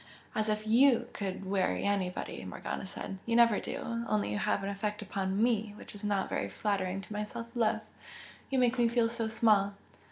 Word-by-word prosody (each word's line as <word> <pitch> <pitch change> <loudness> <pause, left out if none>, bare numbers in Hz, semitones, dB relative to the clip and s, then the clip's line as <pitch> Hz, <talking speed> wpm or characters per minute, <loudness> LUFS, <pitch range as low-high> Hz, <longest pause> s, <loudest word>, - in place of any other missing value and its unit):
"As 215 -1 0
if 215 0 0
YOU 240 +3 +5
could 195 -1 -4
weary 185 - +1
anybody!" 195 -3 -1
Morgana - - -5
said. 195 0 -6
"You 230 - +2
never 235 -3 +6
do 230 0 -3
only 215 -1 +1
you 205 - -1
have 210 -1 +1
an 195 - -2
effect 210 +1 -3
upon 190 0 -2
ME 220 -3 +1
which - - -11
is 205 0 -10
not 205 -2 +1
very - - -2
flattering 195 -2 -1
to 210 - -9
my 210 0 -1
self 230 +2 -6
love! 220 -2 +2 0.7
you 270 - 0
make 250 -1 +3
me 240 - +5
feel 230 -1 +2
so 230 -1 -2
small!" 210 -3 +3
210 Hz, 195 wpm, -31 LUFS, 195-230 Hz, 0.7 s, never